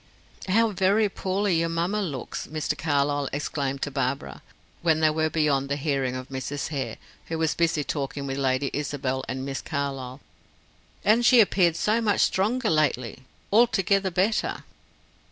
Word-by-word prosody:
"How 225 +4 +3
very 200 +2 +2
poorly 190 -2 0
your 165 0 0
mamma 175 +6 -1
looks!" 145 -10 -5
Mr. 155 -1 -2
Carlyle 145 -2 0
exclaimed 140 -1 -2
to 145 - -2
Barbara, 130 - -3 0.4
when 160 -2 +3
they 155 -1 +4
were 155 0 0
beyond 145 -3 +1
the 140 - 0
hearing 135 -3 -1
of 130 +1 -6
Mrs. 135 +2 -4
Hare, 140 -4 -3 0.3
who 165 - -3
was 160 -1 +1
busy 165 -3 +1
talking 140 0 -3
with 135 0 -3
Lady 135 0 0
Isabel 135 -2 -2
and 130 +1 -3
Miss 135 0 -4
Carlyle. 135 -3 -4 0.9
"And 225 +3 +4
she 250 +1 +6
has 230 - +9
appeared 175 -4 +2
so 215 +6 +1
much 210 -3 +2
stronger 220 +4 +1
lately; 130 -5 0 0.3
altogether 200 -4 +3
better." 190 +5 0
155 Hz, 155 wpm, -25 LUFS, 135-190 Hz, 0.9 s, has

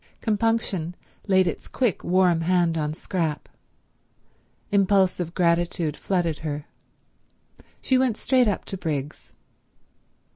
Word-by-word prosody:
Compunction 210 -6 0 0.3
laid 190 -1 +4
its 170 - -4
quick, 245 -7 -1
warm 180 -2 +3
hand 175 -1 +2
on 150 -2 -1
Scrap. 160 -1 -3 1.2
Impulsive 190 -3 +2
gratitude 170 -3 +1
flooded 170 -4 -1
her. 150 -2 -4 1.2
She 260 -1 +3
went 250 -5 +1
straight 255 -3 +3
up 205 - -1
to 195 - -5
Briggs. 150 -5 -5
180 Hz, 105 wpm, -24 LUFS, 165-200 Hz, 1.2 s, laid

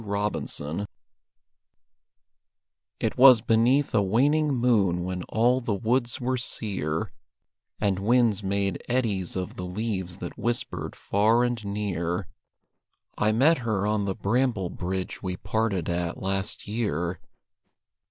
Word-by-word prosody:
REVISITED 100 -4 -3 2.1
It - - -2
was 130 -3 +9
beneath 120 +6 +3
a 110 - +4
waning 140 +10 +2
moon 110 -9 +2
when 90 0 -3
all 120 +3 +2
the 115 -4 -1
woods 120 +3 0
were 130 +1 0
sear, 95 -10 -2 0.7
And 100 -3 +1
winds 115 -1 +3
made 100 -1 -1
eddies 110 -8 0
of 90 -1 -4
the 90 - -4
leaves 95 -2 -3
that 90 -2 -7
whispered 120 0 -2
far 110 +4 +2
and 120 -3 -1
near, 95 -3 -2 0.9
I 105 - +2
met 140 +8 +4
her 110 -5 -1
on 105 -1 +1
the 95 -1 -2
bramble 110 -3 0
bridge 95 +1 -4
we 90 -2 -3
parted 105 -3 -1
at 85 0 -2
last 95 +3 -3
year. 90 -6 -2
105 Hz, 125 wpm, -26 LUFS, 95-120 Hz, 2.1 s, was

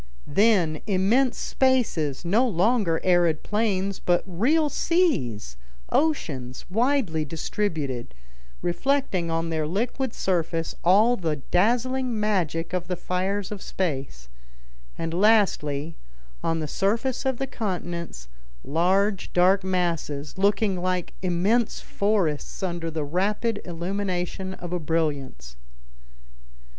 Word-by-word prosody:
Then 180 -4 +3
immense 220 +7 +2
spaces, 215 - +1
no 220 +9 +3
longer 195 -3 +2
arid 175 -4 +3
plains, 200 -3 0
but 175 -1 +1
real 250 - +2
seas, 240 - 0 0.3
oceans, 140 - -1
widely 225 - +1
distributed, 150 - -3 0.5
reflecting 185 -2 0
on 165 0 -1
their 155 -1 -1
liquid 235 - -1
surface 165 -3 -1
all 215 +7 +5
the 160 -5 -1
dazzling 240 - +1
magic 180 -6 0
of 180 -1 -2
the 180 - -1
fires 190 +3 -2
of 205 -2 -5
space; 135 - -3 0.7
and, 165 0 -3
lastly, 170 -7 +2 0.5
on 165 0 0
the 155 - -3
surface 230 - 0
of 265 -2 0
the 270 - -1
continents, 175 - -4 0.4
large 190 +6 +1
dark 185 +2 +4
masses, 170 -6 -2
looking 200 -1 +1
like 185 -1 -1
immense 190 +6 +1
forests 195 -7 -1
under 170 -2 -2
the 160 -1 -3
rapid 205 - 0
illumination 185 +1 -3
of 175 -1 -7
a 180 - 0
brilliance. 145 - -2
185 Hz, 110 wpm, -25 LUFS, 165-215 Hz, 0.7 s, all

